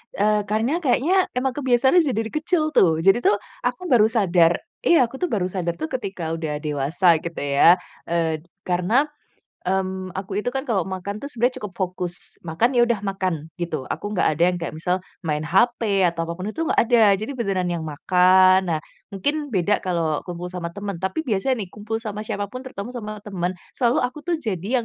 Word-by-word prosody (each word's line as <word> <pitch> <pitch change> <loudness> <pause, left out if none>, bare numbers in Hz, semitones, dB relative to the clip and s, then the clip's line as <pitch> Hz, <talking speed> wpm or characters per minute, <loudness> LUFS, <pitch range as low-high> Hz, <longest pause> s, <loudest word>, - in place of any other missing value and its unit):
Eee, 210 +1 +3
karena 225 - 0
kayaknya, 350 +6 +2
emang 260 +1 +1
kebiasaan 265 +4 +3
aja 285 -8 +1
dari 225 0 -2
kecil 310 0 +1
tuh. 165 - +3
Jadi 195 +5 +5
tuh, 225 - +3 0.3
aku 245 +3 -2
baru 220 -4 +6
sadar 180 -7 +3 0.3
iya, 340 - +5
aku 235 - -11
tuh 355 +6 -2
baru 185 -5 0
sadar 175 -2 -2
tuh, 315 - -2
ketika 190 -9 -4
udah 155 -2 -3
dewasa, 155 +4 +2
gitu 170 -1 -5
ya. 145 +6 +5 0.2
Eee, 165 -2 -1 0.2
karena, 185 +11 +2 0.6
mmm, 185 0 -2
aku 195 +2 -3
itu 245 - -1
kan, 270 +1 -4
kalau 195 -7 +1
makan 190 +2 -5
tuh, 215 - -9
sebenarnya 245 +2 +1
cukup 210 -7 -6
fokus. 180 -2 -3
Makan, 225 +11 +1
ya 240 - +6
udah 235 -3 0
makan, 185 -6 -2
gitu. 165 -6 -4
Aku 205 - -4
nggak 195 - +2
ada 165 - 0
yang - - -3
kayak 165 - -5
misal, 180 +3 -1 0.2
main 150 -2 0
HP 195 +4 +2
atau 165 -1 0
apapun 185 +5 -4
itu, - - -6
nggak - - 0
ada. 240 0 +3 0.2
Jadi 215 +8 -5
beneran 200 -8 -1
yang 170 - -2
makan. 185 +4 +4
Nah, - - -4 0.3
mungkin 290 +10 -2
beda 205 -3 +1
kalau 165 -4 -1
kumpul 180 0 -7
sama 175 -2 -4
temen. 200 0 -6
Tapi 190 - -2
biasanya 230 0 0
nih, - - -15
kumpul 210 +2 -4
sama 215 -2 -5
siapapun, 205 +2 -4
terutama 250 -3 -7
sama 215 -3 -7
temen. 185 -3 -3 0.2
Selalu 245 0 +1
aku 255 +4 -3
tuh, 340 +2 -1
jadi 225 - -2
195 Hz, 190 wpm, -23 LUFS, 175-240 Hz, 0.6 s, baru